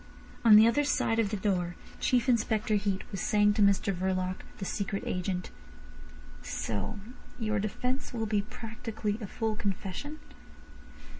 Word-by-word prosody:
On 225 -2 +9
the 215 +1 +9
other 260 +6 +3
side 230 -5 +1
of 220 -3 +2
the 210 - -2
door, 180 -3 0 0.2
Chief 250 0 +2
Inspector 220 -3 +2
Heat 200 -2 0
was 195 -3 -3
saying 205 -1 +4
to 210 - 0
Mr 200 0 +4
Verloc, 185 0 -1 0.2
the 195 - -4
secret 200 +1 -2
agent: 180 0 -2 0.9
"So 110 - -3 0.4
your 220 -2 0
defence 250 +6 -2
will 225 -2 -2
be 210 -1 +1
practically 225 -1 -4
a 210 - -4
full 220 +1 -2
confession?" 200 +9 -4
210 Hz, 145 wpm, -30 LUFS, 195-225 Hz, 0.9 s, On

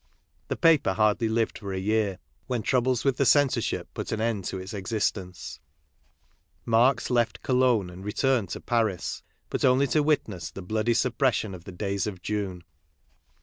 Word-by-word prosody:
The - - -2
paper 160 - +4
hardly 105 +3 +2
lived 115 0 0
for 100 -2 -6
a 95 - -3
year, 105 -1 0 0.3
when 125 -4 -2
troubles 125 0 +1
with 135 -2 +2
the 140 - +2
censorship 145 +1 +2
put - - -5
an 110 - -1
end 110 -4 -1
to 95 - -3
its 95 +3 -7
existence, 95 -2 -3 1.1
Marx 120 +4 +3
left 120 -3 +1
Cologne 125 -7 +2
and 90 +2 -10
returned 110 0 +1
to - - -5
Paris, 110 -7 -1 0.3
but - - -2
only 130 +2 +4
to 150 +3 +2
witness 140 - 0
the 95 - -9
bloody 110 +4 0
suppression 120 -3 +1
of 90 -2 -10
the - - -8
days 100 +2 -2
of 95 -3 -5
June. 95 -3 -3
110 Hz, 165 wpm, -26 LUFS, 95-125 Hz, 1.1 s, paper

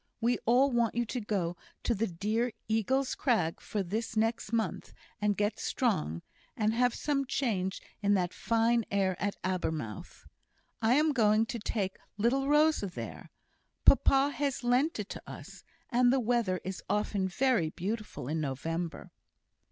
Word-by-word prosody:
We 240 +1 +1
all 260 +4 +5
want 235 -2 +1
you 240 0 +1
to 245 +2 -3
go 190 -5 -1 0.3
to 240 - +1
the 225 +1 0
dear 215 +7 -1
Eagle's 255 +5 +1
Crag 220 - +1
for 205 -2 -2
this 220 +4 -3
next 225 -1 0
month, 230 -2 -2 0.3
and 205 -1 +1
get 205 +1 0
strong, 80 +2 -1 0.3
and 215 0 +2
have 245 +1 +2
some 285 -2 0
change 195 -9 -1 0.2
in 205 0 +3
that 180 -2 0
fine 230 +1 +2
air 195 -2 +1
at 205 +1 0
Abermouth. 160 - -3 0.6
I 225 +3 +4
am 305 +2 +4
going 220 -4 +3
to 235 0 -5
take 200 -3 -2 0.2
little 255 +6 +2
Rosa 300 -6 +4
there. 180 - -7 0.6
Papa 275 +1 +5
has 280 -3 -2
lent 250 +6 +2
it 205 - -4
to - - -6
us. - - -10 0.3
And 245 0 +4
the 265 - +3
weather 230 -6 +1
is 190 0 -5
often 205 -2 0
very 230 -4 +2
beautiful 205 - -4
in 155 +2 -1
November." 160 +5 -4
220 Hz, 155 wpm, -31 LUFS, 190-245 Hz, 0.6 s, all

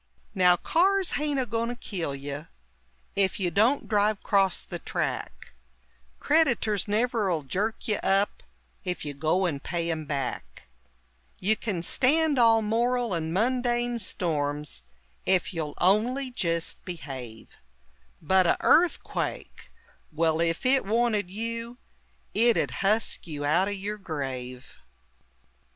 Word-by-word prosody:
Now 180 -3 +5
cars 380 - +2
haint 285 +2 0
a 260 - +1
goin' 230 0 -2
to 245 - -3
kill 175 - -4
you 140 +3 -6 0.7
Ef 195 -1 +1
you 180 -3 0
don't 230 +9 +2
drive 210 -1 +1
'crost 195 -3 +1
the - - -4
track; - - -4 0.7
Crediters 240 - +2
never'll 210 - 0
jerk 210 - -2
you 215 - +1
up 195 +1 +1 0.4
Ef 180 -4 -4
you 145 - -4
go 160 +7 +1
and 145 -6 -2
pay 170 0 -2
'em 155 -1 -3
back; 135 - -4 0.7
You 210 +4 +2
kin 195 -7 -3
stand 290 - +3
all 225 -1 +5
moral 235 +1 0
and 160 -1 -2
mundane 240 +3 0
storms 150 -6 -2 0.5
Ef 190 0 +2
you'll 155 -3 -4
on'y 245 +8 +2
jist 170 -8 -2
behave 130 - -8 0.6
But 185 +2 +3
a' - - +3
EARTHQUAKE: 340 +1 +1 0.4
well, 160 +1 +1
ef 165 +4 0
it 265 +1 +4
wanted 215 -2 +1
you 230 +4 -4 0.6
It 235 +1 +4
'ud - - 0
husk 210 -1 +1
you 145 -3 -4
out 170 +6 +3
o' - - -2
yer 205 +1 -4
grave! 135 -8 -6
195 Hz, 130 wpm, -27 LUFS, 165-235 Hz, 0.7 s, Now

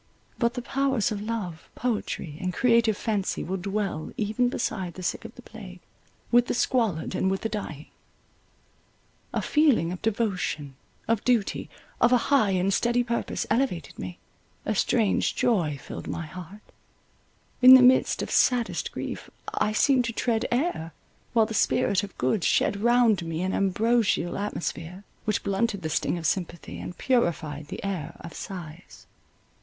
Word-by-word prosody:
But 235 -1 +1
the 245 - -4
powers 270 -5 0
of 205 -1 -3
love, 210 -7 -5
poetry, 215 -9 -3
and 185 -1 -1
creative 230 0 +3
fancy 210 -4 -1
will 185 - -3
dwell 195 -4 -3
even 220 +4 +1
beside 190 -8 -3
the 185 - -8
sick 180 - -2
of 225 - -9
the 250 - -13
plague, 195 -6 -11 0.5
with 240 +1 +5
the - - -1
squalid, 225 -11 0
and 190 - +1
with 190 0 -1
the 225 - -2
dying. 165 -9 -5 1.5
A - - -2
feeling 275 - +3
of 180 - -6
devotion, 185 - -1 0.3
of 225 -2 +1
duty, 235 -5 +1 0.3
of 240 - +5
a 250 - +6 0.2
high 250 -8 +5
and 190 +1 +1
steady 240 +3 +2
purpose, 235 0 -2
elevated 220 - -1
me; 90 -1 -6 0.5
a 215 - 0
strange 215 +1 +1
joy 170 - +1
filled - - -8
my 170 - -4
heart. 185 +5 -10 1.0
In 255 +1 +11
the 255 - +8
midst 255 +1 +4
of - - -6
saddest 245 -2 +2
grief - - -6 0.2
I 210 - +1
seemed 250 +3 +3
to 230 - -3
tread 225 -1 0
air, 240 - -1 0.4
while 225 -2 +5
the 220 - -6
spirit 200 -2 +2
of 200 -2 -9
good 130 - 0
shed 200 +5 +2
round 235 -5 +4
me 165 +1 -3
an 190 - -1
ambrosial 205 -2 +1
atmosphere, 180 -2 -4 0.2
which 215 -2 0
blunted 200 0 -1
the 160 - -2
sting 165 - 0
of 165 - -6
sympathy, 175 0 -2
and 180 - -7
purified 160 - 0
the - - -7
air 190 -6 -4
of 170 -2 -9
sighs. 175 -1 -9
205 Hz, 160 wpm, -26 LUFS, 180-235 Hz, 1.5 s, In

